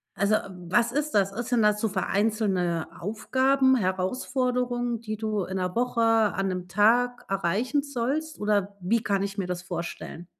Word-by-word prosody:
Also, 200 +3 +2
was 190 +6 0
ist 300 +1 -1
das? 195 -1 +2
Ist 240 +4 -5
denn 240 - +3
das 210 0 +3
so 220 - +1
vereinzelte 190 -4 0
Aufgaben, 260 +6 +2
Herausforderungen, 245 +4 -1
die 215 -2 -4
du 215 -3 -1
in 190 +1 -4
'ner 180 -1 -2
Woche, 240 -1 0
an 220 -4 +3
'nem 180 -1 -3
Tag 240 +5 +3
erreichen 205 - 0
sollst 285 +4 -3
oder 205 -1 0
wie 220 +5 +1
kann 200 -1 0
ich 200 +1 -4
mir 190 - -2
das 180 -1 -3
vorstellen? 175 -1 -6
215 Hz, 160 wpm, -26 LUFS, 190-245 Hz, -, denn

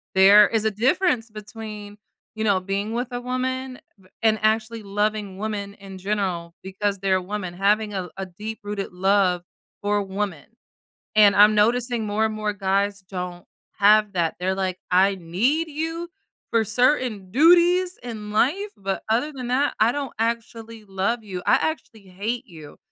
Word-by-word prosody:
There 200 +2 +8
is 220 -1 -1
a 220 - +2
difference 245 - +1
between, 210 -1 -9 0.4
you 220 - -3
know, 200 -3 +3
being 200 +3 -3
with 245 +2 -2
a 245 0 -4
woman 255 +1 -3 0.4
and 220 -1 +3
actually 220 +1 0
loving 205 -1 -2
women 205 -1 -4
in 195 -2 -11
general 185 -4 -2
because 195 +1 -2
they're 190 -1 +1
women, 185 -2 -5
having 205 +3 +1
a 185 -2 -4
a 195 - -4
deep 210 +5 -7
rooted 205 -2 -4
love 190 -1 +2 0.4
for 205 0 +1
woman, 195 -5 -4 0.7
and 205 -2 +6
I'm 210 +1 +7
noticing 235 +1 +1
more 210 +1 +1
and 220 - -1
more 215 -1 -2
guys 200 +1 0
don't 180 -2 -6 0.3
have 210 0 +5
that, 170 -3 0
they're 185 +1 0
like, 185 -1 -2
"I 195 +2 +4
need 225 - 0
you 325 +3 -4 0.4
for 230 -1 +3
certain 220 -4 +1
duties 350 - +4
in 215 -3 -7
life, 345 - +1
but 195 -1 -3
other 245 +7 +1
than 250 -2 -6
that, 275 +3 +1
I 225 +2 +4
don't 285 -1 -4
actually 230 -1 -3
love 195 +4 -2
you, 185 -3 -6
I - - +5
actually 235 -9 -3
hate 220 +7 -4
you." 155 -5 -13
210 Hz, 160 wpm, -23 LUFS, 195-235 Hz, 0.7 s, There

